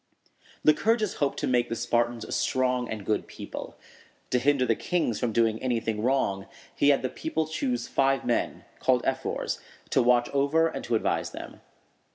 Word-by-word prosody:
Lycurgus 215 +7 +3
hoped 145 -2 0
to - - -1
make 120 -1 +2
the 115 - -2
Spartans 120 -1 0
a - - -10
strong 125 +1 0
and 105 -3 -5
good 105 - 0
people. - - -8 0.5
To 125 - +3
hinder 135 0 +3
the 115 - +3
kings 165 - -1
from 120 -3 0
doing 115 0 +2
anything 115 -4 -1
wrong, 110 -6 0 0.3
he 145 - +4
had 140 -2 +3
the - - +1
people 160 +3 -2
choose 250 - -2
five 135 -1 +1
men, 120 - -1
called - - +2
ephors, - - -2 0.3
to - - +4
watch 120 0 +4
over 140 +4 +2
and 160 - -5
to 120 - 0
advise 110 - 0
them. - - -9
125 Hz, 175 wpm, -27 LUFS, 115-145 Hz, 0.5 s, he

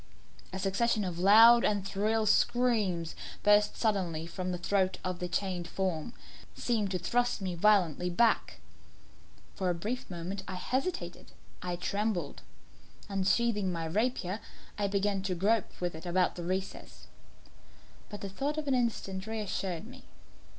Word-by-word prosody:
A 190 - -4
succession 205 +3 +1
of 175 -2 -4
loud 225 +5 +8
and 200 -2 +1
shrill 215 +3 0
screams, 210 -7 +2 0.3
bursting 210 0 +4
suddenly 185 -8 0
from 180 +2 -4
the 180 - -2
throat 190 +1 +1
of 185 -1 -3
the 180 - -2
chained 180 -2 -2
form, 190 +2 -2 0.4
seemed 220 -5 0
to 185 - -1
thrust 240 +8 0
me 190 -2 -3
violently 180 -2 +3
back. 180 - +1 0.9
For 185 - -1
a 175 - +1
brief 220 +9 -4
moment 180 +2 -5
I 190 - -5
hesitated 265 - -3 0.3
I 180 -1 -2
trembled. 200 -3 -2 0.7
Unsheathing 195 +1 +1
my 165 -2 -3
rapier, 205 +1 -1 0.4
I 205 -1 0
began 200 0 0
to 190 -1 -2
grope 210 +5 0
with 175 -1 -2
it 160 +3 -8
about 180 +1 +2
the 175 - -6
recess; 190 +2 -4 1.0
but 205 - -8
the 200 - -4
thought 280 +9 -2
of 305 -1 -3
an 275 - +2
instant 220 -5 -1
reassured 205 -4 -3
me. 255 +3 -13
195 Hz, 145 wpm, -31 LUFS, 180-220 Hz, 1.0 s, loud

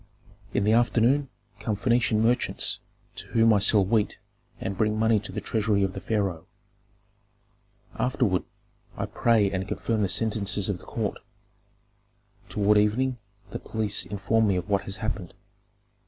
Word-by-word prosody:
"In - - 0
the 105 - +3
afternoon 120 +4 +3 0.3
come 110 - -2
Phœnician 115 0 +2
merchants, 120 +2 +1 0.4
to - - -7
whom 115 -1 +4
I 105 - +4
sell 100 0 +5
wheat 105 +1 0 0.4
and 95 - -4
bring 110 +1 0
money 110 0 +3
to 100 -1 -5
the 105 - -4
treasury 105 -1 0
of 95 -1 -1
the - - -7
pharaoh. 100 -7 -2 1.5
Afterward 120 -7 0 0.6
I - - -2
pray 110 -4 +2
and 95 0 -3
confirm 110 +1 -1
the 100 - +1
sentences 105 -1 0
of 95 -3 -2
the - - -15
court; - - -3 1.3
toward 105 0 +3
evening 125 +4 +1 0.3
the - - -4
police 105 -4 -1
inform 105 +4 0
me 100 - +2
of 90 +1 -3
what 100 -2 0
has 95 +1 -4
happened. 95 -5 -4
105 Hz, 150 wpm, -26 LUFS, 100-115 Hz, 1.5 s, sell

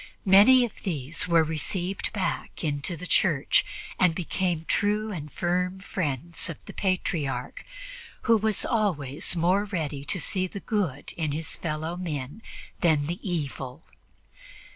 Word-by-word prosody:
Many 210 +7 +8
of 230 - -10
these 155 -4 -2
were 170 -2 +5
received 175 +4 -2
back 195 -3 -3
into 150 +3 -1
the 180 - -7
Church 155 -6 +3 0.4
and 180 -3 +4
became 175 -1 -1
true 210 +1 +1
and 150 -6 -6
firm 180 +3 0
friends 170 -4 -2
of 165 - -8
the - - -9
Patriarch, 185 - -1 0.6
who 230 - +5
was 220 -1 +2
always 170 - +1
more 180 +4 +3
ready 155 -8 -3
to 185 - -1
see 185 +3 -1
the 200 - -7
good 185 - -2
in 155 -3 -1
his 155 +2 -1
fellowmen 155 - -4 0.4
than 155 -4 +3
the 170 +4 -3
evil. 140 -8 -4
175 Hz, 135 wpm, -27 LUFS, 150-190 Hz, 0.6 s, Many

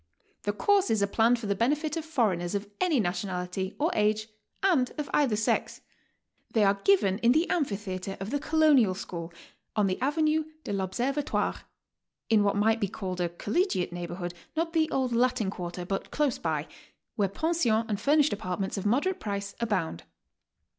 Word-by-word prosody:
The 205 - +2
courses 225 - +2
are - - +5
planned 225 +4 +3
for 230 - -7
the 200 - +1
benefit 295 - 0
of 325 - -3
foreigners 210 - 0
of 200 0 -2
any 340 -7 +3
nationality 180 0 -2
or 320 +4 +1
age 215 +1 +1 0.3
and 320 -10 +3
of 300 -1 -4
either 270 -7 +3
sex. 215 +1 0 0.7
They 220 - +4
are 200 0 +2
given 205 - +3
in 235 +1 +4
the 320 +4 +2
amphitheatre 195 - -2
of 195 +4 -5
the 285 - 0
Colonial 285 -11 +4
School 170 -2 -6 0.4
on 210 -2 +3
the 185 +2 -1
Avenue 310 +3 +2 0.2
de 205 - -3
r 190 -1 -1
Observatoire, 275 +9 -1 0.3
— - - -19
^in 215 -2 +6
what 205 0 +2
might 220 +2 +3
be 200 - +2
called 185 -2 -4
a 175 - +1
collegiate 200 - -1
neighbor*hood, 175 0 -5 0.2
not 330 +1 -1
the 320 -1 +2
old 260 -2 0
Latin 240 -4 +2
Quarter, 175 -1 -5
but 195 +1 -3
close 295 -5 0
by, 155 -2 -2 0.2
— - - -47
where 200 -3 +1
pensions 235 - +1
and 210 -3 -2
furnished 295 +1 +4
apartments 195 -1 -3
of 195 - -2
moderate 290 - +1
price 200 -1 -4
abound. 185 - -1
215 Hz, 175 wpm, -28 LUFS, 190-285 Hz, 0.7 s, ^in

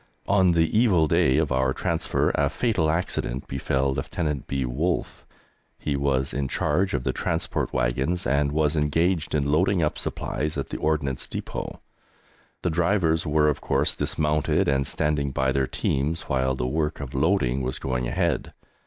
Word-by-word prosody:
On 95 -3 +4
the 80 +1 +1
evil 105 -8 +4
day 80 -4 +3
of 75 -3 +1
our 65 0 +2
transfer - - 0
a - - +2
fatal 100 -10 0
accident 75 -6 -1
befell 65 0 0
Lieutenant 75 +1 -3
B. 70 -1 -1
Wolffe. 75 +9 -2 0.5
He 75 - -2
was 70 -1 0
in 70 -1 -1
charge 95 +9 0
of 60 - -2
the - - -1
transport - - -2
wagons 65 +9 0
and 70 +2 +1
was 75 0 +1
engaged 80 +2 +1
in 70 -1 +1
loading 90 +3 +2
up 75 - -1
supplies 75 +3 -3
at 70 -1 -3
the - - -4
Ordnance 75 -4 -1
Depôt. - - -5 0.9
The 90 - +1
drivers 85 -1 +1
were, 75 0 +3
of 75 - 0
course, - - +2
dismounted 75 -1 0
and 70 -1 +1
standing 75 -2 0
by 65 0 0
their 65 -1 +1
teams 75 +7 -1
while 65 -3 0
the 60 - -2
work 75 +3 -1
of 70 -1 -6
loading 70 -3 +1
was 65 0 -2
going 65 -2 -2
ahead. 85 +2 -1
75 Hz, 165 wpm, -25 LUFS, 65-80 Hz, 0.9 s, On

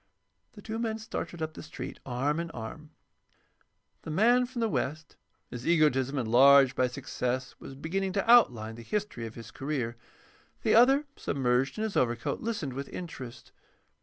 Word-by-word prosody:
The 205 - -13
two 225 +1 -4
men 225 -2 -1
started 195 -6 -5
up 155 0 -4
the - - -9
street, - - -8
arm 135 +5 0
in 170 0 -3
arm. 135 +7 -8 1.1
The - - -8
man 240 +9 +4
from 250 -1 -6
the 225 - +2
West, 155 -5 -3 0.4
his 120 0 -6
egotism 145 -5 +3
enlarged 130 +2 +6
by 130 - +2
success, 125 0 -3
was 135 - -10
beginning 185 +7 -2
to 200 +2 -1
outline 120 - +5
the 115 - -10
history 195 - -3
of 110 - -11
his 115 -2 -10
career. 130 -3 -3 0.7
The - - +3
other, 270 +6 +6
submerged 130 - 0
in 215 - -1
his 220 -2 -3
overcoat, 120 -2 0
listened 210 - -3
with 140 +2 -5
interest. 130 -9 -8
140 Hz, 165 wpm, -29 LUFS, 125-200 Hz, 1.1 s, enlarged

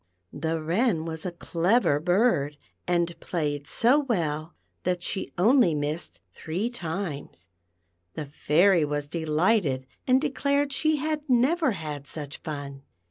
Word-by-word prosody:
The 160 +2 -2
Wren 170 +2 +1
was 160 +1 -4
a - - -3
clever 170 -1 +2
bird, 175 - +2 0.3
and 170 -1 +1
played 145 -4 -2
so 250 +5 +4
well 165 - -2 0.3
that 180 -1 -1
she 190 - -3
only 210 - +5
missed 150 +2 -3
three 185 +9 -3
times. 160 - -5 0.7
The 150 - -4
Fairy 165 +5 +3
was 145 -1 -2
delighted 160 - +1 0.2
and 255 0 +5
declared 280 0 0
she 310 +2 +2
had 300 0 -2
never 265 +3 +3
had 150 -5 -6
such 145 -2 -5
fun. 140 -3 -6
170 Hz, 130 wpm, -26 LUFS, 150-235 Hz, 0.7 s, only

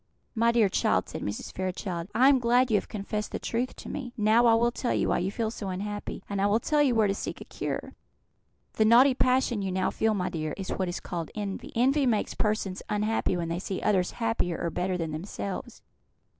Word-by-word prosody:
"My 230 0 +3
dear 230 -3 +4
child," 190 - +1
said - - -6
Mrs. 105 +1 -5
Fairchild, 185 -2 -3
"I 255 +3 +6
am 275 -2 +6
glad 245 +1 +3
you 210 - +5
have - - -3
confessed 210 +1 -4
the - - -2
truth 245 +2 -2
to - - -10
me. 255 -4 -5
Now 220 +3 +4
I 230 - +6
will 235 +1 +3
tell 245 0 -1
you - - +1
why - - +2
you 180 +2 -1
feel 220 +2 -2
so 205 -4 -5
unhappy, 205 +3 -5
and 200 -1 -2
I 200 - +3
will 210 +2 +3
tell 300 +5 +2
you 265 -5 +3
where 220 -1 +4
to 195 - +1
seek - - -5
a - - -7
cure. - - -4 0.8
The 220 - +2
naughty 250 +5 +7
passion 250 -3 +2
you 190 -1 -2
now 185 0 0
feel, 220 -1 +1
my 180 -2 -1
dear, 155 -3 -3
is 190 -1 -5
what 185 -2 -1
is 175 - -4
called 170 -3 -5
Envy. 210 +7 -5
Envy 265 +4 +3
makes 220 -4 +1
persons 210 -3 -1
unhappy 210 -3 0
when 170 -1 -3
they 170 +1 -2
see 190 0 -4
others 190 -4 +2
happier 225 -7 0
or 170 - -2
better 180 +2 -1
than 165 -2 -3
themselves. 195 +7 -6
210 Hz, 225 wpm, -28 LUFS, 185-235 Hz, 0.8 s, naughty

